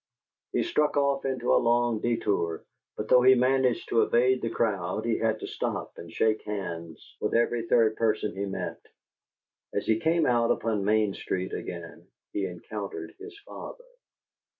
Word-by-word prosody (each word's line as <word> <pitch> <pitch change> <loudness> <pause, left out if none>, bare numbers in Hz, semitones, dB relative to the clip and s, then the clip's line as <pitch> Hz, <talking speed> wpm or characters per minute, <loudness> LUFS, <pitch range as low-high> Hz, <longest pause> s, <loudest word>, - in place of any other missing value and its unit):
He - - +1
struck 150 - +1
off 140 -1 +1
into 130 -2 0
a - - +5
long 120 -1 +2
detour, 105 -8 -1 0.3
but 105 - -4
though 125 +2 +6
he 130 +1 +7
managed 130 -1 +2
to 115 - +4
evade 125 +2 +3
the 115 - -1
crowd, 100 -2 -1
he 115 -1 +1
had 110 -1 +1
to - - -4
stop - - -3
and 85 - -9
shake 110 +4 +1
hands 85 -6 -6
with - - 0
every 115 0 +1
third 115 -2 +3
person 110 -2 0
he 100 +1 -2
met. 95 - -5 0.9
As 100 - -1
he 110 0 +2
came 165 +2 +2
out 120 -1 +3
upon 110 -3 0
Main 105 -1 +2
Street 95 -1 -3
again, 85 -2 -7 0.3
he 100 -2 -1
encountered 100 +3 -6
his 405 0 -10
father. - - -9
115 Hz, 165 wpm, -27 LUFS, 100-125 Hz, 0.9 s, he